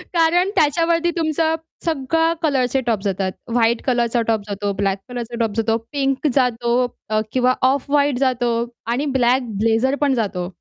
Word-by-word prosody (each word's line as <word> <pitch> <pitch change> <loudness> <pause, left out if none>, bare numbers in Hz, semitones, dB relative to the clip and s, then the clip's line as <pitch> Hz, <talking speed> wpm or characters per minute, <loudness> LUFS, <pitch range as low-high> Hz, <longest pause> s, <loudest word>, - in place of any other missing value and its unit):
कारण 345 +3 +3
त्याच्यावरती 335 +3 +2
तुमचं 320 0 +1 0.3
सगळं 325 +2 +1
कलरचे 265 -3 +1
टॉप 225 -4 +1
जातात. 190 -1 -1 0.2
व्हाईट 235 -1 +2
कलरचा 240 -2 +1
टॉप 220 -2 +1
जातो, 200 0 -2
ब्लॅक 195 0 -1
कलरचा 240 -1 -5
टॉप 225 -2 +1
जातो, 225 0 +1
पिंक 275 0 0
जातो 240 -3 +1 0.4
अ, 215 0 +1
किंवा 255 0 +3 0.2
ऑफ 280 0 -4
व्हाईट 285 -3 +2
जातो 245 -3 +1 0.4
आणि 275 +5 -1
ब्लॅक 245 0 +2
ब्लेझर 230 +4 +2
पण 275 - +2
जातो. 180 -4 -3
250 Hz, 155 wpm, -20 LUFS, 225-290 Hz, 0.4 s, कारण